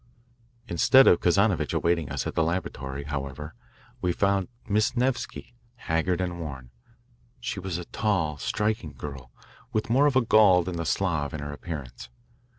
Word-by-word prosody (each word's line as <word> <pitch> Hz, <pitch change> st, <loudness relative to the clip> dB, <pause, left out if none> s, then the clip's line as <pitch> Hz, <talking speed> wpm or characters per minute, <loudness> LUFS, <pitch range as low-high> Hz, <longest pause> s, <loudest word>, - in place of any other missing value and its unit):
Instead 130 Hz, +10 st, +5 dB
of 85 Hz, -, +6 dB
Kazanovitch 100 Hz, +2 st, +2 dB
awaiting 85 Hz, -5 st, +1 dB
us -, -, -3 dB
at -, -, -3 dB
the -, -, +1 dB
laboratory, 70 Hz, -5 st, -3 dB
however, 70 Hz, +1 st, -5 dB, 0.5 s
we 90 Hz, -, +1 dB
found 100 Hz, +1 st, +1 dB, 0.2 s
Miss 110 Hz, +5 st, +1 dB
Nevsky, 125 Hz, -1 st, -2 dB, 0.2 s
haggard 85 Hz, -3 st, -1 dB
and 90 Hz, -2 st, -3 dB
worn. 65 Hz, -6 st, -7 dB, 0.7 s
She 115 Hz, -4 st, -4 dB
was 95 Hz, -2 st, -3 dB
a 90 Hz, -, -6 dB
tall, 85 Hz, -10 st, -1 dB
striking 105 Hz, -6 st, -1 dB
girl 70 Hz, -4 st, -8 dB, 0.4 s
with 110 Hz, +1 st, -1 dB
more 140 Hz, +4 st, +5 dB
of 145 Hz, -, +2 dB
the 130 Hz, -, +5 dB
Gaul 105 Hz, -6 st, +5 dB
than 90 Hz, 0 st, -4 dB
the 85 Hz, -, -3 dB
Slav 80 Hz, -7 st, 0 dB
in -, -, -5 dB
her 75 Hz, 0 st, -5 dB
appearance. 70 Hz, -6 st, -7 dB
85 Hz, 155 wpm, -26 LUFS, 75-100 Hz, 0.7 s, of